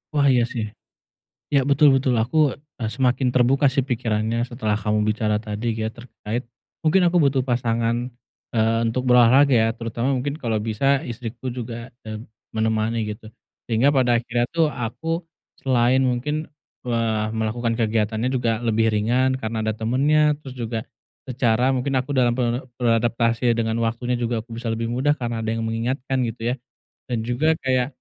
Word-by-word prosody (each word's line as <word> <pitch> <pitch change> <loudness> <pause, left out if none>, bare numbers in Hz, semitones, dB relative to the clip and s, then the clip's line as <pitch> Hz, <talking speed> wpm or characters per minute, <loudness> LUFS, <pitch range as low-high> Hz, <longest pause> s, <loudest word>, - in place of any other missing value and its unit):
Wah, 140 -1 +4
iya 120 -2 +4
sih. 115 -4 -2 0.9
Ya, 140 - +6
betul 145 +2 +5
betul. 130 -1 +1
Aku, 125 +7 -2 0.4
eee, 110 -2 -2
semakin 130 0 +1
terbuka 130 +3 +3
sih 135 -3 +2
pikirannya 115 -2 0
setelah 110 -4 -1
kamu 105 0 +1
bicara 105 -1 +1
tadi 105 +1 -4
ya 110 - 0
terkait, 120 -1 -5 0.4
mungkin 165 +4 +3
aku 175 +1 +3
butuh 135 -2 +2
pasangan, 115 -1 +1 0.6
eee, 115 0 +2
untuk 125 +3 -1
berolahraga 125 +3 +6
ya. 115 -2 +4
Terutama 115 +2 -2
mungkin 140 +3 -2
kalau 115 -3 0
bisa 110 +4 -2 0.2
istriku 120 +1 -6
juga, 120 -1 -7
eee, 110 0 -5 0.4
menemani, 110 +1 0
gitu. 105 +1 -8 0.4
Sehingga 125 +6 +3
pada 125 -3 +3
akhirnya 120 +1 -1
tuh 165 -1 +2
aku 160 +9 -3 0.4
selain 130 0 +3
mungkin, 135 +5 -1 0.4
eee, 115 -3 0
melakukan 115 +1 -1
kegiatannya 110 +1 0
juga 115 -3 +1
lebih 115 0 +2
ringan 125 +5 +1
karena 110 -2 -3
ada 110 0 0
temennya, 145 +7 +3
terus 130 -3 -10
juga 115 -1 -3 0.5
secara 125 0 +2
mungkin 135 +1 0
aku 130 +2 0
dalam 125 -4 +2
ber 120 +1 -1 0.2
beradaptasi 115 0 +2
dengan 115 -1 -1
waktunya 120 +2 -1
juga 120 -1 -1
aku 115 - -23
bisa 120 - -8
lebih 115 0 -2
mudah 130 +5 +2
karena 120 -5 -4
ada - - -1
yang 115 - -2
mengingatkan, 125 +3 -1
gitu 115 0 -6
ya. - - -4 0.5
Dan 115 -2 -2
juga 155 +7 +1
kayak, 130 -1 +2
120 Hz, 160 wpm, -23 LUFS, 115-130 Hz, 0.9 s, Ya